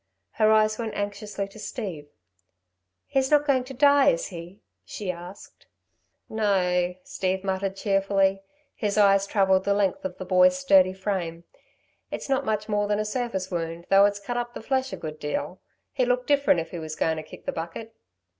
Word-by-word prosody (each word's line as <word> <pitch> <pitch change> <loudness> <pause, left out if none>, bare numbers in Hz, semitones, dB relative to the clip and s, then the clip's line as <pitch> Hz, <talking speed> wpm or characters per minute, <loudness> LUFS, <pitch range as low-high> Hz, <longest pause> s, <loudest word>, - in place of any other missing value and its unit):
Her 215 0 +3
eyes 215 0 +3
went 225 -2 -4
anxiously 205 0 -4
to 215 - -14
Steve. 195 - -6 1.0
"He's 265 -1 0
not 295 -1 +4
going 265 -3 +2
to 270 - -8
die, 285 +1 +5
is 165 - 0
he?" 175 +3 -10 0.2
she 200 -3 -4
asked. 180 +3 -12 0.6
"No," 180 -4 +1
Steve 190 0 -2
muttered, 190 0 -2
cheerfully. 195 -1 +1 0.3
His 210 -1 -2
eyes 195 -1 +4
travelled 190 -2 +3
the 200 0 +1
length 200 -2 0
of 185 -1 -5
the 185 - -6
boy's 180 0 +4
sturdy 185 0 +4
frame. 185 -4 -3 0.7
"It's - - -6
not 270 -1 +1
much 215 -1 -1
more 205 -1 0
than 205 0 +1
a 215 - -1
surface 210 -5 -3
wound, 165 0 -4
though 195 +1 +7
it's 205 0 0
cut 240 +5 -4
up 240 0 -4
the - - -7
flesh 265 +1 0
a - - -5
good 155 -1 -7
deal. 150 +4 -4 0.3
He'd 255 -3 +1
look 250 0 +1
different 280 - +3
if 165 - -9
he 175 - -5
was 155 -1 -6
goin' 160 0 0
to - - -3
kick 155 - -13
the - - -1
bucket." 170 +8 -6
195 Hz, 185 wpm, -25 LUFS, 180-215 Hz, 1.0 s, though